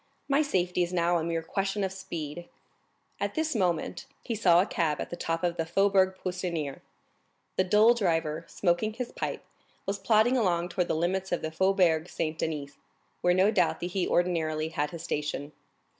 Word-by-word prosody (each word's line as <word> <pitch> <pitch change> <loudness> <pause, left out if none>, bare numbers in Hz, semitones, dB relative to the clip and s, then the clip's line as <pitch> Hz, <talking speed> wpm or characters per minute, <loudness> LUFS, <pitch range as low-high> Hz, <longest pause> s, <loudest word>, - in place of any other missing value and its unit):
My 280 +2 +3
safety 180 -11 0
is 175 0 0
now 175 -1 +2
a - - -2
mere 165 0 -1
question 195 +3 -1
of 190 -1 -2
speed." 170 -3 -6 0.7
At - - -2
this 315 -1 0
moment 185 +4 -1 0.2
he 235 - -3
saw 180 -6 +5
a 185 - +4
cab 160 -7 0
at - - -5
the - - -3
top 165 0 -2
of 175 -1 0
the 165 - +1
Faubourg 190 +1 +3
Poissonnière. 175 -6 -3 0.8
The 185 - +2
dull 215 +5 +6
driver, 165 -7 0
smoking 185 +4 0
his 245 +1 -5
pipe, - - -4 0.4
was 200 0 -2
plodding 230 +3 +3
along 175 -6 +1
toward 180 -2 -1
the - - 0
limits 185 +4 -1
of 175 - -1
the 160 - -2
Faubourg 175 -2 +2
Saint 160 -1 -3
Denis, 145 -3 -4 0.4
where 180 0 +3
no 190 +3 +4
doubt 220 - +2
he 180 +1 -1
ordinarily 160 -3 +1
had 150 -2 -1
his 165 0 -8
station. 150 -2 -3
175 Hz, 180 wpm, -28 LUFS, 165-195 Hz, 0.8 s, dull